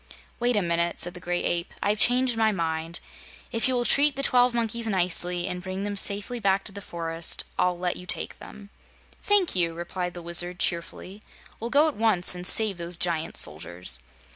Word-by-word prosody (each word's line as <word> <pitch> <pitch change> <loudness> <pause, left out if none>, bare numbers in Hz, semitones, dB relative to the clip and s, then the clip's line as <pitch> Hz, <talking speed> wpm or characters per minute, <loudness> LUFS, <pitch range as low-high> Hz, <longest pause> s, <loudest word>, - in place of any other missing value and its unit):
"Wait 240 0 +1
a 205 - +1
minute," 170 0 -1
said 175 - -2
the 180 - -10
Gray 175 0 -2
Ape. 170 0 -2
"I've 205 +1 0
changed 250 +1 +5
my 220 -1 +2
mind. 165 -2 -4 0.5
If 230 0 -1
you 260 - 0
will 240 -1 -1
treat 285 +2 +3
the 275 - -3
twelve 250 -2 +3
monkeys 235 -1 -2
nicely 180 -2 0
and 180 -1 -5
bring 190 +1 -5
them 205 0 -4
safely 205 +4 +1
back 195 -2 +1
to - - -3
the 200 +1 -8
forest, 165 -2 -2 0.2
I'll 180 -1 +1
let 180 0 -2
you 180 - -10
take - - -3
them." 205 -1 -13 0.5
"Thank 405 - +1
you," 170 -2 0
replied 175 +1 -5
the 175 - -8
Wizard, 175 +1 +4
cheerfully. 180 +3 -4 0.4
"We'll 230 - -5
go 290 +5 +4
at 310 - -3
once 210 -6 +4
and 180 0 +1
save 210 -5 +4
those 170 0 -3
giant 170 -2 -1
soldiers." 80 -3 -1
185 Hz, 195 wpm, -25 LUFS, 170-225 Hz, 0.5 s, changed